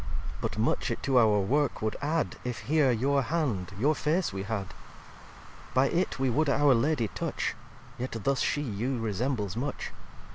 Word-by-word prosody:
xvii - - -7
"But - - -3
much - - +1
it - - -3
to 130 -2 +4
our 110 -3 +5
work 140 +8 +1
would 110 - 0
add 155 +3 0
If 125 -2 -4
here 150 -2 +3
your 135 +4 +2
hand, 120 - -1
your 140 +9 +3
Face 160 - 0
we 95 - -3
had: 100 -2 -4 1.0
By 130 +1 +4
it 180 +2 0
we 135 0 +1
would 145 +5 +2
our 140 0 +5
Lady 120 -2 +1
touch; - - -2 0.5
Yet 125 +2 -3
thus 135 -1 +1
She 145 - +1
you 120 +2 -2
resembles 110 -2 -1
much. 135 +4 -3
130 Hz, 175 wpm, -29 LUFS, 110-145 Hz, 1.0 s, our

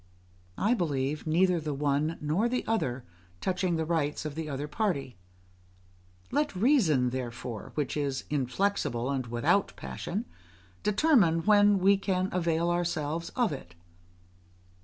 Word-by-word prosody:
I 215 +5 +2
believe 150 - -1
neither 175 +2 +3
the 150 -2 -3
one 145 +3 0
nor 165 +11 +1
the 250 +1 -1
other 130 - -1 0.3
touching 180 - 0
the 160 -1 -1
rights 155 -2 -1
of 155 - -3
the 160 0 -5
other 145 +1 -3
party; 150 - -2 1.2
let 290 -3 0
reason 180 - +3
therefore, 120 -3 -5
which 150 -3 -1
is 140 -3 -1
inflexible 135 -2 0
and 130 -3 -2
without 120 0 +1
passion, 170 - -4 0.6
determine 210 - +3
when 205 -1 +5
we 195 +1 +4
can 190 -1 -1
avail 170 -1 +1
ourselves 170 -2 -1
of 245 -7 +2
it. 85 - -9
160 Hz, 130 wpm, -29 LUFS, 140-195 Hz, 1.2 s, when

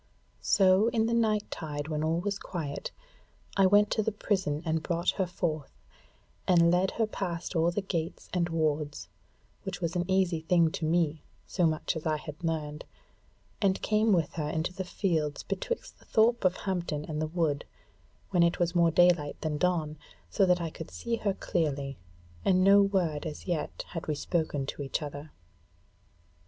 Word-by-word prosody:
So 190 +2 +4
in 230 -2 +2
the 230 - 0
night 215 -3 +1
tide 150 -2 -4
when 155 -1 -2
all 160 +2 +1
was 200 +1 -2
quiet 150 -6 -4 0.7
I 195 -1 +5
went 205 +2 +5
to 220 - +2
the 220 - 0
prison 190 -7 -1
and 160 0 0
brought 170 +1 0
her 190 -2 -1
forth, 160 -4 -3 0.7
and 170 -2 +5
led 180 +2 +3
her 225 - +3
past 180 -4 -4
all 165 +1 +3
the 190 +3 -2
gates 170 -4 -3
and 175 -1 +1
wards, 150 - -1 0.5
which 190 -2 -5
was 170 -1 -2
an 175 +1 -1
easy 185 -3 +2
thing 165 0 +3
to 160 - -3
me, 160 -2 +1 0.2
so 175 -4 +1
much 155 +1 -1
as 160 0 -3
I 155 -1 +1
had 150 +2 -9
learned, 155 -2 -2 0.8
and 195 -2 +2
came 215 +1 +3
with 170 -6 +2
her 150 -3 -2
into 160 +3 -2
the 190 - -4
fields 160 -6 -1
betwixt 200 - -4
the - - -21
thorp 230 0 +3
of 185 0 +3
Hampton 175 -6 -2
and 155 -1 -3
the 155 - 0
wood, 155 -3 0 0.7
when 180 -3 +3
it 170 0 +3
was 175 -1 +1
more 170 -1 +4
daylight 170 -3 +3
than 150 -2 -2
dawn, 160 -4 0 0.3
so 195 - +3
that 180 0 +4
I 165 -2 -3
could 160 - -8
see 235 -1 -3
her 200 -3 -1
clearly, 140 -5 -2 0.4
and 185 -1 +4
no 200 +1 +7
word 180 -6 0
as 150 - -7
yet 170 -5 -3
had 165 - -6
we 155 - 0
spoken 150 -3 -1
to 140 - -5
each 140 +3 -2
other. 145 +1 -7
170 Hz, 180 wpm, -29 LUFS, 155-190 Hz, 0.8 s, no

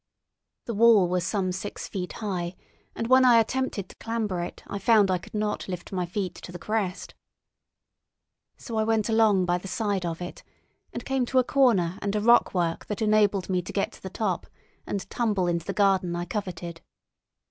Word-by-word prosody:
The 235 - -3
wall 220 -3 +6
was 180 0 0
some 185 0 -1
six 190 +3 -5
feet 180 -2 -5
high, 180 -4 -3 0.4
and 230 - -2
when 260 +2 +6
I 240 -2 +7
attempted 225 -4 -1
to - - -15
clamber 220 -6 -2
it 175 - -7
I 200 - -5
found 205 -1 +4
I 180 - +1
could 175 - -12
not 210 0 -2
lift 180 -2 -6
my 180 -2 -2
feet 185 0 -3
to 175 - -10
the 175 - -7
crest. 200 -1 -3 1.4
So 230 -3 -6
I 220 - +3
went 220 0 +1
along 220 -4 +4
by 175 0 +1
the 195 - -9
side 200 -2 -1
of 170 -1 -3
it, 175 0 -7 0.5
and - - -6
came 265 -2 0
to 260 - 0
a 255 - +6
corner 210 -11 +2
and 200 0 -1
a - - +2
rockwork 185 -7 +3
that 210 +1 -2
enabled 210 -3 +3
me 185 -1 0
to 175 - -8
get 200 - -1
to - - -16
the 190 - -6
top, 190 -3 -2 0.4
and 200 - -3
tumble 210 -6 0
into 170 -1 -1
the - - 0
garden 190 -4 +2
I 175 0 -3
coveted. 175 -3 -5
200 Hz, 195 wpm, -26 LUFS, 180-220 Hz, 1.4 s, I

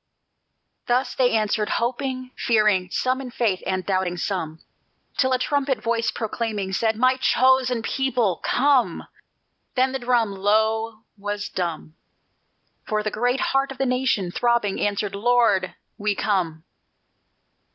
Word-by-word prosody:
Thus 250 +1 +1
they 255 -2 +3
answered 215 -1 0
hoping, 255 +1 -2
fearing, 210 -5 +2
Some 255 +6 0
in 260 - -7
faith 230 -7 0
and 185 -1 -1
doubting 185 -2 0
some, 165 -3 -3 0.6
Till 260 -1 +2
a 255 - +3
trumpet 275 0 0
voice 230 +1 0
proclaiming, 215 -3 -3
Said: 220 +3 +1
"My 255 +2 +3
chosen 255 -2 +3
people, 245 -9 0
come!" 250 - +2 0.7
Then 260 0 +2
the 265 - -3
drum, 240 -3 +1
Lo! 220 +3 0 0.2
was 205 +1 -4
dumb; 170 -3 -4 0.9
For 215 0 0
the 215 - -2
great 245 +4 0
heart 270 0 +1
of 270 - -8
the 270 - 0
nation, 250 -8 0
throbbing, 235 -2 +1
answered: 205 -1 -1
"Lord, 205 -4 +2 0.2
we 210 0 0
come!" 170 -7 -1
225 Hz, 130 wpm, -23 LUFS, 200-255 Hz, 0.9 s, they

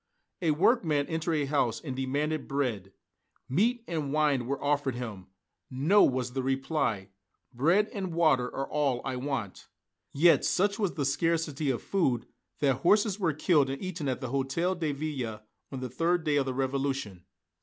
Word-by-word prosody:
A 170 - +1
workman 155 - +2
entered 160 +1 -1
a 150 -2 +1
house 135 -5 0
and 135 -5 -6
demanded 145 +4 -2
bread. 120 -9 -2 0.6
Meat 225 - +1
and 155 -5 -3
wine 145 -5 +1
were 140 +1 -2
offered 145 -3 0
him. 110 -7 -6 0.4
"No," 150 +11 +4
was 125 -1 +1
the 135 - -1
reply, 135 -6 -1 0.4
"bread 170 - +3
and 190 -4 -3
water 155 -7 +3
are 135 +2 -4
all 140 -5 0
I 135 -1 -2
want." 125 -7 -4 0.4
Yet 165 +4 +5
such 200 +3 +1
was 200 -5 0
the 145 - -1
scarcity 155 0 0
of 125 - -1
food 135 - 0 0.4
that 135 -4 +3
horses 205 - +3
were 170 -5 +2
killed 150 -2 +2
and 135 - -4
eaten 180 -5 -4
at 130 0 -2
the 130 -3 -4
Hôtel 150 +7 -1
de 155 -3 0
Ville, 135 -7 -4 0.3
on 135 -2 -5
the 130 - -3
third 165 +7 0
day 150 -2 +1
of 135 -1 +1
the 130 - -1
Revolution. 135 -8 -2
140 Hz, 170 wpm, -29 LUFS, 130-165 Hz, 0.6 s, Yet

